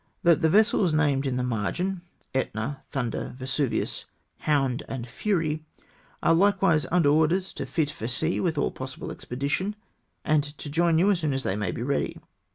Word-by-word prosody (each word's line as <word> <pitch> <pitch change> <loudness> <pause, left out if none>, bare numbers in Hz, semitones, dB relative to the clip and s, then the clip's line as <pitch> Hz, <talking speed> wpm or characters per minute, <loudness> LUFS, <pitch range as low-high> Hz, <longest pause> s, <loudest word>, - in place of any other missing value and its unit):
" - - -45
That 170 -3 +5
the 160 - +4
vessels 205 -4 +4
named 145 -3 +2
in 125 -1 -1
the 125 - 0
margin 150 - -1 0.3
{Etna, 130 +1 -2
Thunder, 125 -2 -3
Vesuvius, 130 0 -1 0.3
Hound, 135 -4 +1
and 125 -3 -4
Fury), 155 - -1 0.6
are - - +5
likewise 190 -3 +3
under 170 -4 +4
orders 160 +5 +2
to - - -5
fit 155 -4 0
for 115 - -5
sea 155 +7 0
with 165 -4 0
all - - +1
possible 130 0 -6
expedition, 145 +11 -2 0.5
and 155 -1 +3
to 145 0 -7
join 165 +1 +3
you 190 +5 +4
as 190 - +1
soon 155 -4 0
as 135 - -2
they 95 - 0
may 105 -4 -1
be 115 - -4
ready. 140 +2 -1
150 Hz, 175 wpm, -26 LUFS, 130-170 Hz, 0.6 s, That